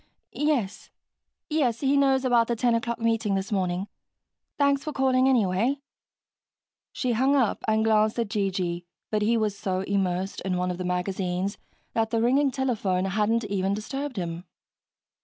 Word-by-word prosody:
"Yes. 280 -10 -1 0.6
Yes, 265 -7 0
he 275 0 +2
knows 270 -1 +3
about 240 -2 +4
the 235 - 0
ten 240 +1 +2
o'clock 230 +1 -1
meeting 225 -3 +1
this 195 +1 -3
morning. 185 -1 -1 0.7
Thanks 280 -1 +2
for 305 - -3
calling, 265 -1 +3
anyway." 230 +2 +2 1.1
She 255 - -1
hung 260 +5 +3
up 250 -6 +1
and 220 0 +2
glanced 215 0 +3
at 230 -3 -1
G.G., 185 -4 -1 0.3
but 215 -1 +1
he 230 +3 +2
was 215 -2 0
so 190 -2 -2
immersed 190 -1 -1
in 185 -1 -1
one 180 0 0
of 180 - -6
the 185 - -3
magazines 180 +1 -2 0.3
that 225 -1 +1
the 230 0 0
ringing 270 +5 +3
telephone 220 -9 0
hadn't 215 +4 +1
even 200 -1 -1
disturbed 255 +5 -5
him. 170 -1 -4
220 Hz, 160 wpm, -26 LUFS, 190-255 Hz, 1.1 s, about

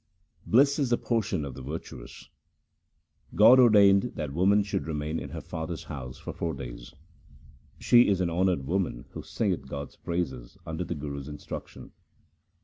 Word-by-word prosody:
Bliss 140 +5 +4
is 135 -4 +1
the 120 - +3
portion 110 - -1
of 70 - -6
the 65 - -9
virtuous: 75 +6 -8 0.5
— - - -48 0.3
God 115 +5 +8
ordained 105 -2 +5
that 75 -3 -4
woman 100 +5 +3
should 100 -5 -3
remain 75 0 -3
in - - -7
her - - -6
father's 80 +1 -6
house 65 -5 -7
for - - -7
four 80 -3 -3
days. - - -9
1 75 - -26 0.8
She 120 0 +5
is 100 -2 +2
an 90 -2 0
honoured 90 -4 +1
woman 85 -7 -2
who - - -7
singeth 95 -11 -2
God's 70 +1 -7
praises 65 -9 -4
under 80 +2 -4
the - - -4
Guru's 70 -1 -6
instruction. 75 -1 -8
85 Hz, 165 wpm, -27 LUFS, 70-100 Hz, 0.8 s, God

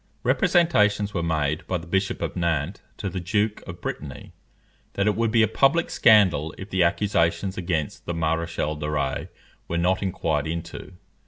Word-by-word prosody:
Representations 105 - +3
were 85 - -1
made 80 -2 -1
by 90 - 0
the 80 - -9
Bishop 95 +3 -1
of - - -3
Nantes 85 -5 -1 0.2
to - - -4
the 95 0 -3
Duke 105 +4 0
of 85 0 -8
Brittany, 70 -3 -6 0.6
that 100 - 0
it 105 - +2
would 115 0 +1
be 115 0 +4
a - - +4
public 140 - +2
scandal 95 -9 +4
if 95 +1 -9
the 95 - +1
accusations 85 0 +1
against 85 -5 -3
the 85 - -1
Maréchal 80 -1 -1
de 75 0 -3
Rays 70 -3 -2 0.4
were 85 - -2
not 90 +2 +1
inquired 80 -6 -1
into. 85 +3 -6
85 Hz, 170 wpm, -24 LUFS, 80-100 Hz, 0.6 s, be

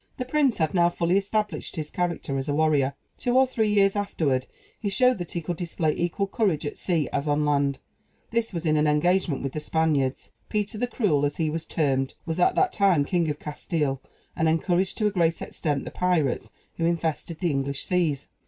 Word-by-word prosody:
The 255 - -3
prince 270 -4 +2
had 160 -2 0
now 175 -2 +4
fully 175 +1 0
established 200 -3 -1
his 155 -2 -4
character 170 -6 -2
as 135 +3 -4
a 145 - +1
warrior. 145 -3 +2 0.2
Two 245 0 +1
or 265 - +6
three 225 -5 0
years 195 -1 +4
afterward, 150 -10 0 0.3
he 205 - -2
showed 250 +3 +3
that 175 - -5
he 170 - -2
could 170 +1 -4
display 165 -3 -1
equal 175 +3 -1
courage 195 -7 0
at 145 - -4
sea 165 -5 0
as 140 +2 -1
on 150 +1 +2
land; 140 -2 +1 0.5
this 230 0 0
was 170 -3 -4
in 155 -1 +3
an 150 0 +3
engagement 155 0 +2
with 135 - -3
the 155 - -2
Spaniards. 150 -4 0 0.2
Peter 210 0 -2
the 245 - 0
Cruel 195 - +1
as 145 0 0
he 160 -2 0
was 165 +1 -4
termed 135 -4 0
was 165 +1 -3
at 180 - +3
that 380 -1 +2
time 190 -8 +3
King 170 0 +1
of 145 - -2
Castile, 150 -2 -2 0.3
and 160 0 +2
encouraged, 175 +3 +1
to 215 - 0
a 210 - +3
great 170 -4 +1
extent, 145 -4 -2
the - - -6
pirates 175 -8 0 0.3
who 165 - 0
infested 165 -1 -2
the 175 -3 +1
English 140 0 -1
seas. 165 -6 0
165 Hz, 210 wpm, -26 LUFS, 150-195 Hz, 0.5 s, or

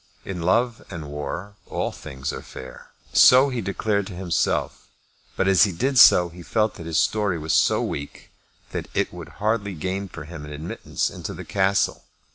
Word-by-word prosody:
In 90 -3 -5
love 115 +7 +1
and 80 -6 -7
war 90 +7 -5
all - - -2
things 65 0 -6
are - - -6
fair. 65 0 -11 0.2
So 130 +2 +7
he 125 -3 -2
declared 100 0 -1
to 95 - -8
himself; 90 -1 -1 0.5
but 95 - +1
as 95 +2 +6
he 100 - -2
did 130 +9 +1
so 90 -6 +8
he 85 +1 -12
felt 110 +4 0
that 80 - -9
his 80 - -1
story 105 -5 +1
was 80 0 -2
so - - +3
weak 70 0 -6 0.4
that - - -4
it - - 0
would 85 -2 -9
hardly 105 -2 -1
gain 95 +5 -3
for 80 -2 -8
him 80 0 -9
an 75 - -8
admittance 80 +4 -3
into - - -6
the - - -8
Castle. 95 -2 +1
95 Hz, 185 wpm, -24 LUFS, 80-105 Hz, 0.5 s, so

